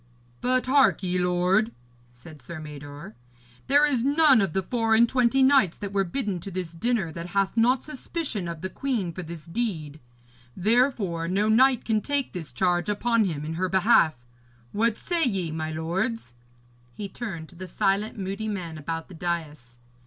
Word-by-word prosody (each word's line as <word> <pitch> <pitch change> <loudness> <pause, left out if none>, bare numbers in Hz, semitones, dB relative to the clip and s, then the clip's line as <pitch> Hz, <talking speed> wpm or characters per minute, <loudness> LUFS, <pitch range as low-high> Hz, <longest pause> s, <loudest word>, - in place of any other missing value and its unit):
'But 255 0 +1
hark 265 -5 +4
ye, 180 0 0
lord,' 180 +5 +2 0.4
said 140 +4 -14
Sir 155 +6 -8
Mador, 145 -4 -9 0.5
'there 290 +2 +5
is 260 -6 +1
none 285 -3 +5
of 190 -5 -1
the 190 - 0
four 225 +2 +1
and 235 +2 +5
twenty 255 +2 +3
knights 260 -10 +4
that 200 -1 -6
were 195 -1 +2
bidden 195 -1 -2
to 185 - -7
this 185 -3 -4
dinner 190 0 -1
that 170 +2 -6
hath 195 +1 +1
not 245 +3 +3
suspicion 295 - -4
of 170 -2 -6
the 190 - -3
queen 230 -11 -2
for 185 - -5
this 165 -2 -9
deed. 165 -7 -3 0.6
Therefore, 205 -5 +1
no 200 +4 +1
knight 250 +2 +4
can 220 -2 +1
take 285 +1 -1
this 165 -4 -6
charge 175 - 0
upon 230 +2 +2
him 150 -5 -3
in 160 - -4
her 185 +3 -1
behalf. 190 -4 +4 0.6
What 220 +1 +1
say 345 -2 -1
ye, 190 - 0
my 155 0 -3
lords?' 170 - -2 0.6
He 205 - -5
turned 190 -6 -6
to 180 - -14
the 185 +2 -8
silent, 195 +5 0
moody 195 +2 -4
men 175 -7 -4
about 165 +2 -4
the 190 - -12
dais. 155 -8 -4
190 Hz, 175 wpm, -26 LUFS, 165-235 Hz, 0.6 s, there